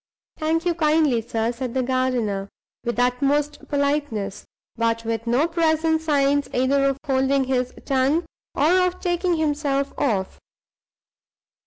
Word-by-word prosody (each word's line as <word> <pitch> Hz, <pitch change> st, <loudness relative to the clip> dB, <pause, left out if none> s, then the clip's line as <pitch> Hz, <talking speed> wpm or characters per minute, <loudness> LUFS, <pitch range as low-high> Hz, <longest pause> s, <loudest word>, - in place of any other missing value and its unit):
"Thank 325 Hz, +2 st, 0 dB
you 350 Hz, -, +2 dB
kindly, 305 Hz, -6 st, +2 dB
sir," 225 Hz, 0 st, -1 dB
said 245 Hz, 0 st, -5 dB
the 260 Hz, -, +1 dB
gardener, 245 Hz, -6 st, -1 dB, 0.3 s
with 240 Hz, -1 st, -2 dB
the 245 Hz, -, +2 dB
utmost 285 Hz, +4 st, 0 dB
politeness, 280 Hz, -9 st, -1 dB, 0.3 s
but 230 Hz, 0 st, 0 dB
with 225 Hz, 0 st, -3 dB
no 255 Hz, +7 st, +2 dB
present 320 Hz, -1 st, +1 dB
signs 285 Hz, -2 st, +1 dB
either 275 Hz, +2 st, +2 dB
of 275 Hz, -1 st, +1 dB
holding 270 Hz, 0 st, +2 dB
his 255 Hz, -1 st, -1 dB
tongue 275 Hz, +5 st, +1 dB, 0.3 s
or 365 Hz, +5 st, +4 dB
of 360 Hz, 0 st, -5 dB
taking 350 Hz, 0 st, 0 dB
himself 290 Hz, -3 st, 0 dB
off. 200 Hz, -8 st, -1 dB
275 Hz, 135 wpm, -23 LUFS, 245-310 Hz, 0.3 s, or